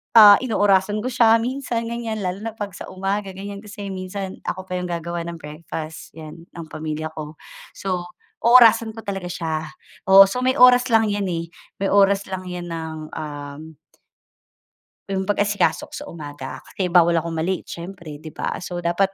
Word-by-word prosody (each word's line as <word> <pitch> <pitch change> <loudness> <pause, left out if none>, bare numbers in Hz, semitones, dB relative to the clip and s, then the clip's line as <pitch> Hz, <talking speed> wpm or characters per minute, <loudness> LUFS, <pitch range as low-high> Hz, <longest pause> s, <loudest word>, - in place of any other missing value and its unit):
ah, 205 -3 +10
inoorasan 205 -3 +2
ko 255 - -1
siya 230 -2 +5
minsan 245 -2 -2
ganiyan 230 -2 -4
lalo 190 +4 -3
na 225 - -4
pag 205 -2 -5
sa - - -7
umaga, 195 +1 -2
ganiyan 200 +1 -7
kasi 205 -1 -8
minsan 190 +1 -5
ako 185 - -3
pa 180 - -2
yung 180 - -3
gagawa 170 0 -4
ng 170 - -5
breakfast 155 +1 -8
yan 160 +1 -10
ng 170 -2 -7
pamilya 155 0 -4
ko. 155 -1 -7 0.4
So 180 -2 -3 0.3
oorasan 230 -2 +6
ko 225 - -9
talaga 195 -4 -5
siya, 160 -2 -3 0.4
oo, 195 +1 +8
so 250 +4 -2
may 260 - +3
oras 250 -2 +6
lang 220 -1 +4
yan, 205 -1 -1
eh, 170 -2 -3 0.3
may 195 - +1
oras 200 0 +3
lang 185 -1 -5
yan 175 -1 -6
ng, 160 -1 -5 0.2
um 150 +1 -7 1.3
'Yong 190 -1 -1
pag-asikaso 205 0 +1
ko - - -19
sa - - -7
umaga 145 -4 -7
kasi 185 -2 -3
bawal 170 -1 +5
akong 165 0 -5
ma-late 180 +4 -2
siyempre 170 -3 -8
'di 155 0 -11
ba. - - -3
So 175 -1 -5
dapat 185 +3 +1
190 Hz, 175 wpm, -22 LUFS, 165-205 Hz, 1.3 s, ah